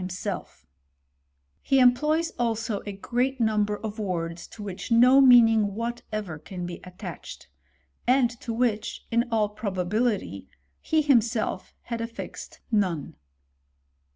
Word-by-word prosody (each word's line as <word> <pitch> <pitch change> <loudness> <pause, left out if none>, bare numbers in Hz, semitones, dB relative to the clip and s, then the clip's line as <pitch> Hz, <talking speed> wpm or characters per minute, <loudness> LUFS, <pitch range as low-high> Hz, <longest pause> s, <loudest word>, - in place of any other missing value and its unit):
f - - -11 1.0
He 270 - +2
employs, 300 +7 +3
also, 225 -3 -1
a - - -2
great 245 +6 -1
num 215 -2 +2
ber 210 0 -3
of 215 0 -5
words 170 -4 -3
to 215 - -10
which 195 +3 -7
no 250 +4 +7
meaning 225 -5 +6
whatever 215 -7 -4
can 180 +2 -7
be 175 0 -6
attached; 180 -2 -9 0.6
and 250 -1 +4
to 235 - -4
which, 225 -2 -1
in 235 +1 +2
all 215 -2 +2
probability, 200 - -2 0.3
he 315 -1 +1
himself 230 -8 +1
had 235 -1 -4
affixed 230 0 -7
none. 185 -9 0
220 Hz, 125 wpm, -26 LUFS, 195-240 Hz, 1.0 s, no